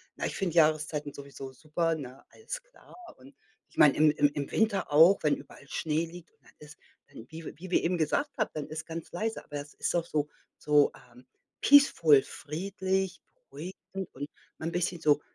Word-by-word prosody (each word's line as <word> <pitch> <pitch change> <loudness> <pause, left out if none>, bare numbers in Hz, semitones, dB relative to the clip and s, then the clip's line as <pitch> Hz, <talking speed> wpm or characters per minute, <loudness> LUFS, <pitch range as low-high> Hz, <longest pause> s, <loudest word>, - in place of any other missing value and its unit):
na - - -3
ich - - -3
finde 175 -4 -2
Jahreszeiten 150 -2 +2
sowieso 140 -1 -9
super, 160 +4 -1
ne? 135 -3 -9
Alles - - -7
klar. - - -19 0.2
Und 270 +1 -16 0.3
ich - - -24
meine, 145 -2 +7
im 155 0 +6
im 145 0 +3
im 145 -1 -4
Winter 205 -7 +1
auch, 165 +6 +7
wenn 150 - +3
überall 140 - -14
Schnee 155 +3 -1
liegt 170 0 -12
und - - -39
dann - - -21
ist, 150 -1 -13 0.3
ähm, 115 - -11
wie 165 +1 -9
wie 185 +3 -9
wir - - +3
eben 175 +1 +1
gesagt 285 - 0
haben, 215 - +1
dann 150 -2 -4
ist 155 - -6
ganz 165 0 -7
leise, 220 +5 -3
aber 145 - -7
es 145 +1 -13
ist - - -1
auch 170 -1 +1
so 150 -3 -1 0.3
so, 150 -1 +4 0.2
ähm, 125 +1 -17 0.4
peaceful, 165 - +6
friedlich, 190 +3 -3
beruhigend 185 +5 -8
und 145 +2 -6 0.3
mal 160 - -4
'n - - -2
bisschen 175 0 -1
so 150 -1 +4
160 Hz, 195 wpm, -29 LUFS, 150-185 Hz, 0.4 s, meine